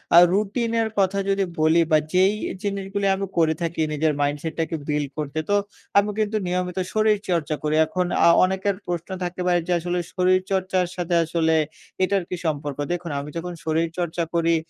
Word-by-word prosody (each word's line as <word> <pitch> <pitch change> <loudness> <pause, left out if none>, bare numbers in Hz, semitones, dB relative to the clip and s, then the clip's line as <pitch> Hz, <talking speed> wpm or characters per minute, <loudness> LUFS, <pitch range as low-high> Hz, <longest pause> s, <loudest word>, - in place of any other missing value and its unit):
আ - - +9 0.2
রুটিনের 225 +2 0
কথা 195 +1 +2
যদি 195 0 +2 0.2
বলি 160 +2 +4
বা 155 - +7 0.2
যেই 190 +3 +4 0.3
জিনিসগুলি 200 0 -2
আমি 195 - -3
করে 160 -1 +4
থাকি 165 -1 -2
নিজের 155 +1 +1
মাইন্ডসেটটাকে 155 +3 -1
বিল্ড 150 -2 -1
করতে, 150 +1 -3
তো 205 - +3 0.4
আমি 200 +1 +4
কিন্তু 215 0 +1
নিয়মিত 180 +1 -2 0.2
শরীরচর্চা 200 -8 +1
করি। 155 0 +1
এখন 180 +3 -1 0.2
আ - - +7 0.2
অনেকের 190 +1 +1
প্রশ্ন 175 0 -3
থাকতে 180 +1 -4
পারে 175 -1 +3
যে, - - -1
আসলে 175 +1 -2
শরীরচর্চার 185 0 +1
সাথে 175 -1 -1
আসলে 160 0 +1 0.5
এটার 195 0 +1
কি 180 - -2
সম্পর্ক? 145 -2 -2
দেখুন, 175 -2 -3
আমি 145 +1 -6
যখন 175 +1 -4
শরীরচর্চা 165 +1 -1
করি, 165 0 +3
175 Hz, 165 wpm, -23 LUFS, 160-195 Hz, 0.5 s, আ